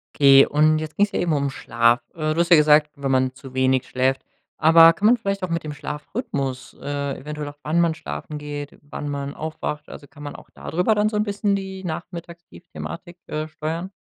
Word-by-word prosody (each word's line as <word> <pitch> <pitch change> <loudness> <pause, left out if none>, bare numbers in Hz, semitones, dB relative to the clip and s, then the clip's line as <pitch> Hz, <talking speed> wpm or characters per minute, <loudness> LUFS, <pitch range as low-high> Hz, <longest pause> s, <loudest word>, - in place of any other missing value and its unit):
Okay 135 -1 +7
und 155 +1 +3
jetzt 155 0 -7
ging's 205 0 +3
ja - - 0
eben 175 -2 0
um 140 -1 0
Schlaf. 120 -1 +2
Äh, 155 -1 -1
du 165 - -2
hast 170 - 0
ja 170 - +8
gesagt: 150 0 +5
„Wenn 140 -1 -2
man 130 0 +2
zu 135 0 -12
wenig 130 0 +2
schläft“, 130 +1 0 0.4
aber 165 +1 +8
kann 205 - -3
man 235 - +7
vielleicht 200 -3 -2
auch 180 - -2
mit 170 0 -2
dem 155 - -5
Schlafrhythmus, 150 - -5
äh, 140 -1 -3
eventuell 150 +1 -6
auch 145 0 -9
wann 160 +3 +1
man 165 -2 +2
schlafen 75 - -6
geht, 145 -1 -7
wann 145 0 -7
man 140 0 -4
aufwacht, 150 -1 -5
also, 145 - -11
kann 145 -1 -14
man 145 - -6
auch - - -13
da - - -9
drüber 180 +6 +2
dann 210 +1 +2
so 220 - -5
'n 210 - +2
bisschen 205 -1 0
die 190 -1 -6
Nachmittagstief-Thematik, 175 +1 -8
äh, 155 +1 -3
steuern? 160 +4 -5
150 Hz, 215 wpm, -23 LUFS, 140-170 Hz, 0.4 s, ja